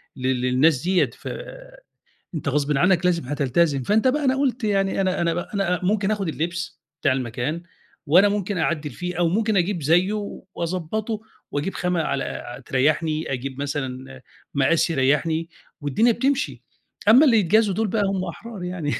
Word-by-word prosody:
لل 130 -1 -1
للناس 130 +3 +3
ديّة 185 +1 +2
ف - - -10 1.1
أنت 150 - -4
غصبٍ 145 0 +1
عنّك 180 +2 +3
لازم 170 -4 +2
هتلتزم. 140 +1 +1
فأنت 215 - +2
بقى 290 +3 +1
أنا 265 0 +3
قُلت 260 -3 0
يعني 195 -2 +1
أنا 185 -2 0
أنا 170 -1 +1
ب - - -4
أنا 180 0 -1
ممكن 200 +1 +1
آخُد 200 -4 -1
اللبس 170 +1 -4 0.2
بتاع 140 -4 +3
المكان 130 +6 -3 0.4
وأنا 180 +7 +6
ممكن 200 -1 -2
أعدِّل 155 -2 -1
فيه 180 +2 -5
أو 170 -1 +3
ممكن 215 +3 +1
أجيب 175 -1 0
زيّه 175 +7 +3 0.4
وأضبّطه 185 +6 -3 0.3
وأجيب 145 +7 -2
خامة 180 -2 0
على 140 -3 -1
ع 120 +2 -6
تريّحني، 155 +4 0
أجيب 130 +1 -5
مثلًا 135 -2 -5 0.3
مقاس 145 +5 +2
يريّحني 160 +3 +1 0.3
والدنيا 145 - +3
بتمشي، 275 +5 -1 0.5
أمّا 255 +7 +8
اللي 240 -6 +5
يتجازوا 210 +2 +3
دُول 220 0 0
بقى 210 +1 0
هم 195 -1 -1
أحرار 225 -6 -8
يعني 180 -5 -3
170 Hz, 160 wpm, -23 LUFS, 145-200 Hz, 1.1 s, أمّا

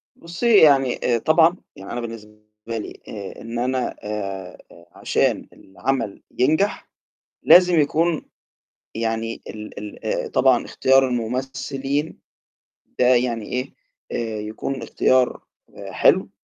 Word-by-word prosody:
بُصّي، 200 +6 +1
يعني 135 -5 +5
آآ 120 -1 +2
طبعًا 165 +6 +4 0.2
يعني 95 - -10
أنا 120 0 -3
بالنسبة 115 -2 -8 0.3
لي، 115 -2 -6
آآ 100 -3 -8
إن 115 +1 -5
أنا 130 +1 -1
آآ 100 -3 -5 0.4
عشان - - 0
العمل 105 +2 -3 0.2
ينجح، 155 +11 +1 0.5
لازم 180 -2 +7
يكون 160 +3 +1 0.7
يعني 115 0 -3
ال 105 -1 -8
ال 105 0 -9
آآ - - -2
طبعًا - - +3
اختيار 135 0 +3
الممثلين 135 +4 -3 0.8
ده 125 - +4
يعني 120 -3 +2
إيه، 125 +1 -4 0.4
آآ 110 -2 -3
يكون 110 +5 -4
الاختيار 130 0 +1 0.5
حلو، - - +3
125 Hz, 115 wpm, -22 LUFS, 110-140 Hz, 0.8 s, لازم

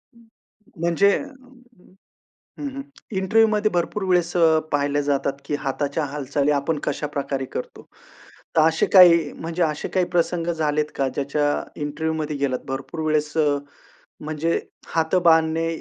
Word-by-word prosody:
हं. 235 - -20 0.6
म्हणजे 170 +4 +3
अ, - - -6 1.4
हं, 290 - -3
हं, 275 - -4 0.3
इंटरव्ह्यू 220 +4 +3
मध्ये 215 0 +1
भरपूर 185 +3 -1
वेळेस 175 -1 +2 0.4
पाहिल्या 145 0 +1
जातात, 140 -1 0
की 145 - -3
हाताच्या 145 +2 -2
हालचाली, 140 0 -1
आपण 145 +2 0
कशाप्रकारे 140 -2 -3
करतो. - - -6 0.7
तर - - +6
असे 160 - +1
काही 170 -5 +7
म्हणजे 165 +2 -4
असे 150 -2 -1
काही 185 -2 0
प्रसंग 170 0 +1
झालेत 150 -2 0
का, 135 -1 +1
ज्याच्या 145 +2 -1 0.2
इंटरव्ह्यू 155 +2 -2
मध्ये 150 -1 -3
गेलात. 140 -2 -1
भरपूर 135 +4 -5
वेळेस 150 -1 0 0.9
म्हणजे, 155 +2 -1 0.3
हात 160 +1 0
बांधणे 160 0 +4
155 Hz, 135 wpm, -23 LUFS, 145-170 Hz, 1.4 s, काही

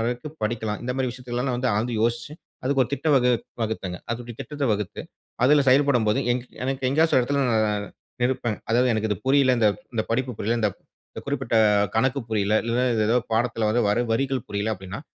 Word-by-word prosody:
வரைக்கும் 125 +7 -3
படிக்கலாம்? 110 -1 -2
இந்த 125 - -2
மாதிரி 130 -1 0
விஷயத்த 125 0 -10
எல்லாம் 125 0 -1
வந்து 125 +1 0
ஆழ்ந்து 115 +4 -1
யோசிச்சி 120 +5 -1 0.3
அதற்கு 135 0 +3
ஒரு - - -3
திட்டம் 150 +1 +1
வகு 125 -1 +3 0.3
வகுத்தேங்க. 95 -5 -3
அதோட 120 0 -6
திட்டத்த 150 -2 -4
வகுத்து 105 -3 -3 0.4
அதுல 145 +2 +5
செயல்படும் 130 -4 +3
போது, 105 - +2
எனக்கு 130 +2 -4
எ - - +3
எங்கேயாச்சு 160 +5 +2
ஒரு 130 - +6
இடத்துல 140 +2 0
நான் 105 -2 +1 0.4
நிற்பேன். 120 -3 0
அதாவது 125 +2 +3
எனக்கு 110 0 0
இது 105 - +1
புரியல்ல, 135 -1 +4
இந்த 110 - +4 0.3
இந்த 110 - +1
படிப்பு 130 +2 0
புரியல்ல, 115 +3 0
இந்த 105 - +3 0.6
குறிப்பிட்ட 135 -5 -1 0.4
கணக்கு 130 +3 +2
புரியல்ல. 105 -1 +1
இல்லன்னா, 120 +2 0
இது 110 - +1
ஏதோ 120 - +3 0.2
பாடத்துல 115 -1 +1
வர 120 - +2
வர 105 +3 +2
வரிகள் 130 0 -1
புரியல்ல, 105 +2 -1
அப்படீன்னா 95 +4 -8
120 Hz, 190 wpm, -24 LUFS, 110-130 Hz, 0.6 s, ஒரு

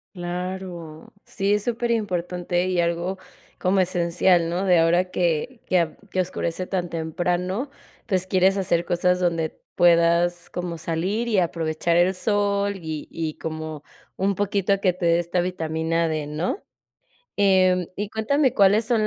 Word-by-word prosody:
Claro, 175 -2 -6
sí 200 +1 -1
es 210 -1 +1
superimportante 185 -7 -1
y 185 -1 0
algo 170 +3 -1 0.4
como 190 +1 +2
esencial, 175 -1 +2
¿no? 180 +3 -1
De 180 -3 +5
ahora 175 +3 +2
que 180 +8 -1
que 185 - +3
a 165 -2 -1
que 185 - -2
oscurece 180 0 -3
tan 180 -2 -2
temprano, 180 - -2 0.4
pues, 185 -4 0
quieres 190 +1 +3
hacer 175 -3 +1
cosas 180 +1 +1
donde 165 -3 -1 0.2
puedas, 170 0 +3
como 175 -2 -5
salir, 185 +8 -1
y 215 -4 +1
aprovechar 165 -1 0
el 180 +2 +3
sol, 200 0 0
y 160 -4 -6
y 160 -2 -3
como 155 -2 -6 0.3
un 195 +1 +1
poquito 200 0 +1
a - - +2
que 185 -3 +2
te 180 -1 -4
dé 170 0 +4
esta 175 +1 0
vitamina 165 -1 -1
D, 155 -2 -2
¿no? 155 - -3 0.7
Em, 185 -3 +3
y 205 +1 -3
cuéntame, 255 +5 +1
¿cuáles 205 +3 +4
son, 230 -2 +2
180 Hz, 150 wpm, -24 LUFS, 170-195 Hz, 0.7 s, De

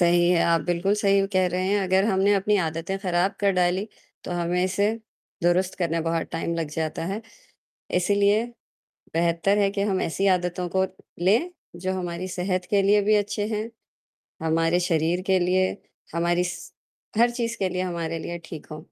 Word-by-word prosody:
सही 175 0 +4
है, 180 -1 +4
आप 165 -1 +3
बिल्कुल 175 +3 +1
सही 195 -1 +3
कह 185 0 +3
रहे 180 +1 -1
हैं, 205 +1 +2
अगर 190 +1 +3
हमने 200 -1 +3
अपनी 205 +2 +2
आदतें 165 +3 -3
खराब 185 0 +1
कर 200 -1 +3
डालीं, 180 +2 +2 0.4
तो - - -6
हमें 175 +1 0
इसे 190 +2 +1 0.6
दुरुस्त 180 +2 +2
करने 165 -1 0
बहुत 165 0 -1
टाइम 165 +1 -2
लग 165 -2 -2
जाता 160 0 -2
है। 210 +3 -4 0.8
इसीलिए 205 +3 +3 0.7
बेहतर 170 +4 +2
है 200 - +3
कि 200 - 0
हम 190 - 0
ऐसी 195 +4 0
आदतों 180 0 -3
को 190 - +4 0.4
लें, 285 - +2 0.3
जो 185 0 0
हमारी 175 0 -4
सेहत 185 0 -1
के 200 -1 +3
लिए 205 0 +5
भी 215 - +6
अच्छी 205 0 -3
हैं, 215 +2 -2 0.7
हमारे 165 +2 +2
शरीर 165 +2 +1
के 190 - +5
लिए, 185 +1 +3 0.5
हमारी 175 +1 +1
स - - -11 0.5
हर 240 +1 +5
चीज़ 235 -1 -2
के 190 - +1
लिए, 185 0 -2
हमारे 170 -2 -3
लिए 175 0 -4
ठीक 155 - -8
हों। 155 - -6
180 Hz, 180 wpm, -25 LUFS, 170-195 Hz, 0.8 s, भी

